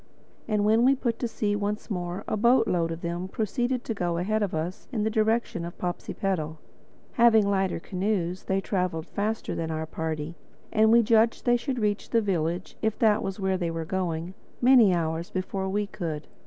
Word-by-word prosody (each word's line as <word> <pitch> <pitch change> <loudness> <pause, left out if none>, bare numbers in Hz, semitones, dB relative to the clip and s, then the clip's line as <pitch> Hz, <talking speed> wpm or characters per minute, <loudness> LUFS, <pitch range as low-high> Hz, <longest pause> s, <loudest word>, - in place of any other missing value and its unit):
And 210 -2 +1
when 220 +2 +4
we 270 +2 +5
put 235 -3 -2
to 240 - -1
sea 210 -2 -1
once 205 +2 -3
more 175 -1 -3
a - - 0
boatload 220 -7 +3
of 165 +1 -5
them 170 +2 -3
proceeded 240 +5 -1
to 225 - -3
go 175 -4 -1
ahead 215 +5 0
of 200 -5 -1
us 165 +4 -4
in 220 -5 -1
the 220 - 0
direction 220 -4 +1
of 170 0 -7
Popsipetel. 175 -2 -3 0.5
Having 225 -3 +5
lighter 195 -3 +1
canoes, 185 -1 -2
they 190 0 0
traveled 180 -5 -1
faster 215 +4 -2
than 165 -1 -3
our 160 0 -2
party; 160 0 -4 0.4
and 220 0 +4
we 235 0 +6
judged 225 +1 +3
that 240 - +4
they - - +6
should 255 +2 -2
reach 210 -2 -1
the 230 - +3
village—if 185 +2 -1
that 215 -2 +3
was 195 +1 -4
where 190 -1 +1
they 170 -2 -1
were 165 -1 -3
going—many 190 +7 +2
hours 165 -1 -1
before 190 +1 -3
we 205 +2 0
could. 160 -6 -5
195 Hz, 185 wpm, -27 LUFS, 170-220 Hz, 0.5 s, we